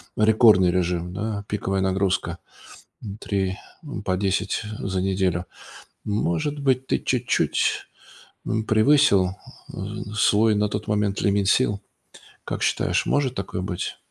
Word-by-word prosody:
рекордный 110 -4 +5
режим, 90 -1 -1
да, 105 +1 -3
пиковая 95 -2 -1
нагрузка. 95 -2 0 0.7
М, 100 -3 -7
3, 95 -1 -2 0.3
м, 145 -9 -7
по 95 -2 0
10 100 +2 0 0.2
за 95 -1 -2
неделю. 95 -2 0 0.6
Может 105 - -1
быть, 130 -2 +1
ты - - +1
чуть-чуть, 125 -1 0 0.6
м, 110 0 -1
превысил, 110 -5 +4 0.4
э, 105 - -6
свой 105 +1 +3
на 105 0 +1
тот 105 +1 -4
момент 105 -2 0
лимит 100 -1 +2
сил? 105 -3 +2 0.6
Как - - -4
считаешь, - - +1
может 135 -3 +1
такое 95 -3 -4
быть? 90 -2 -4
100 Hz, 130 wpm, -24 LUFS, 95-110 Hz, 0.7 s, рекордный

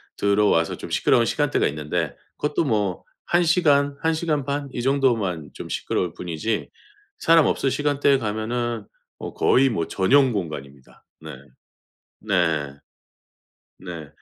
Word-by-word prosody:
들어와서 100 -5 +2
좀 - - -8
시끄러운 - - +3
시간대가 - - +1
있는데 75 +2 -3 0.2
그것도 150 +2 0
뭐 105 - -1 0.3
1 175 0 +4
시간, 145 -5 +3
1 160 0 +2
시간 155 -3 -1
반 140 0 -3
이 120 - -3
정도만 115 - 0
좀 - - -9
시끄러울 90 -2 -2
뿐이지 90 +6 -3 0.5
사람 165 -2 +5
없을 135 - +1
시간대에 145 0 +2
가면은 115 0 -3 0.3
어 - - -7
거의 135 +1 +4
뭐 85 -9 -2
전용 130 +7 +3
공간입니다. 70 -8 -7 0.2
네. 80 -2 -8 0.9
네. 80 -8 0 1.1
네. 85 -5 -8
110 Hz, 260 characters per minute, -23 LUFS, 85-140 Hz, 1.1 s, 사람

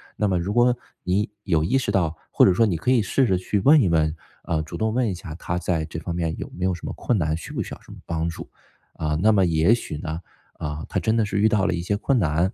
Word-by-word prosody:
那 105 - +1
么 90 - +1
如 95 +4 -2
果 120 +1 +4 0.3
你 100 +3 0
有 80 -5 +1
意 95 +11 +2
识 130 - -1
到 85 -4 +1 0.2
或 - - +5
者 95 - +5
说 115 - +4
你 95 -6 0
可 80 - -2
以 125 - +4
试 130 +6 +2
着 95 -6 +2
去 100 +2 -1
问 150 +4 +6
一 95 - +2
问， 80 -1 +2 0.3
呃， 80 -1 -1
主 75 - -7
动 110 0 0
问 120 -3 +1
一 - - -2
下 85 -3 -8
他 90 +1 -3
在 85 -3 -1
这 80 0 -6
方 85 0 -4
面 85 -2 -2
有 - - -6
没 90 - -4
有 95 - +2
什 85 - -10
么 - - -4
困 120 - 0
难， 80 -2 0
需 85 - -8
不 - - -2
需 - - -8
要 - - -10
什 - - -15
么 - - -10
帮 85 0 -1
助。 80 - -8 0.4
啊， 75 -1 -2
那 110 +1 +5
么 95 -3 +4
也 85 +6 +3
许 80 -10 -6
呢， 80 +2 -5 0.3
啊， 75 +1 -5
他 - - -1
真 110 +1 +1
的 110 - +2
是 100 0 -2
遇 110 - +5
到 105 -3 +2
了 95 - +1
一 85 - -2
些 100 +3 -1
困 130 +4 +1
难， 85 +2 +1
90 Hz, 310 characters per minute, -24 LUFS, 80-105 Hz, 0.4 s, 问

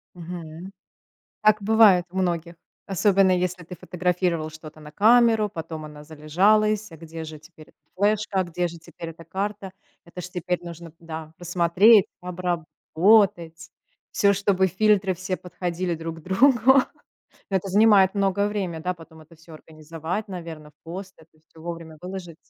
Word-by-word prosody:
Мгм. 170 +1 -8 0.7
Так 215 -1 +4
бывает 210 -4 +5
у 190 - -11
многих. 170 -2 -1 0.3
Особенно, 195 -1 +3
если 180 0 -1
ты 180 - -9
фотографировал 180 -3 -2
что-то 155 0 -12
на 150 0 -12
камеру, 225 -1 +4
потом 160 -4 -7
она 150 0 -11
залежалась. 195 +7 +1
А - - -10
где 165 0 -8
же 155 -1 -9
теперь 155 0 -17
эта - - -25 0.2
флешка? 205 -1 +1
А - - 0
где 175 +1 -2
же 170 0 -10
теперь 170 0 -10
эта 165 +1 -13
карта? 195 +3 -4 0.3
Это 175 +1 -9
ж 180 - -7
теперь 180 0 -3
нужно 170 -1 -10
да, 160 -1 -8
посмотреть, 180 +4 +4
обработать. 175 0 0 0.4
Всё, 200 0 +3
чтобы 195 -1 +1
фильтры 195 0 +2
все 185 +1 -4
подходили 180 -1 -4
друг 165 0 -7
другу. 250 - +4 0.7
Это 195 0 -1
занимает 205 -1 +5
многое 200 0 +1
время, 190 -6 -3
да, 180 +1 -2
потом 160 -2 -15
это 155 +2 -18
всё 165 +1 -16
организовать, 160 +6 -6
наверно, 165 -5 -8
в 145 - -32
пост, 185 +3 -8
это 160 -1 -22
всё 160 - -17
вовремя 165 -1 -8
выложить. 180 -3 -7
180 Hz, 150 wpm, -24 LUFS, 165-195 Hz, 0.7 s, бывает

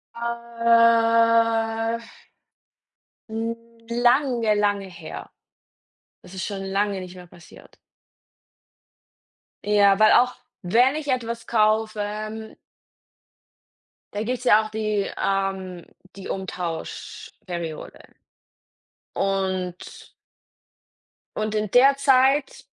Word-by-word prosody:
Äh 230 -1 +2 1.3
hm, 225 +1 -3 0.4
lange, 240 -2 +2
lange 205 -1 0
her. 165 -3 -9 0.9
Das 185 - -14
ist 185 - -4
schon 195 -2 -5
lange 195 0 -1
nicht 185 0 -10
mehr 180 -1 -12
passiert. 170 0 -17 1.9
Ja, 205 -1 +4
weil 215 - +6
auch, 250 +1 +4 0.3
wenn 245 +10 +3
ich 300 -2 -5
etwas 235 -2 -2
kaufe, 215 -1 +1
ähm 215 +1 -6 1.6
da 205 +1 -2
gibt 250 +2 -2
es - - -11
ja 220 -2 +5
auch - - -7
die 215 -2 -2
ähm, 190 -2 -2 0.3
die 195 - -9
Umtauschperiode. 170 -2 -6 1.2
Und 190 -2 -3 1.3
und 215 0 -2
in 210 -1 -1
der 270 +3 +6
Zeit, 270 +1 +2
215 Hz, 90 wpm, -23 LUFS, 195-230 Hz, 1.9 s, weil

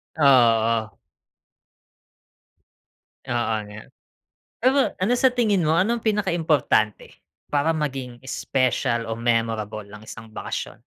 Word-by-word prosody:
Oh, 155 - -1
oo. 115 -4 +4 2.4
Oo 120 -2 0
nga. 105 +1 -10 0.8
Pero 260 +3 +3 0.2
ano 195 +7 +1
sa 260 - +4
tingin 210 -8 +1
mo, 155 - +2
anong 220 +7 +1
pinaka 210 -1 +1
importante 150 - +1 0.4
para 145 +3 +1
maging 130 -5 -4
special 120 -3 -1
o 115 - -3
memorable 115 -3 -1
ang 105 +1 -12
isang 115 0 -10
bakasyon? 110 - -5
125 Hz, 110 wpm, -23 LUFS, 115-165 Hz, 2.4 s, oo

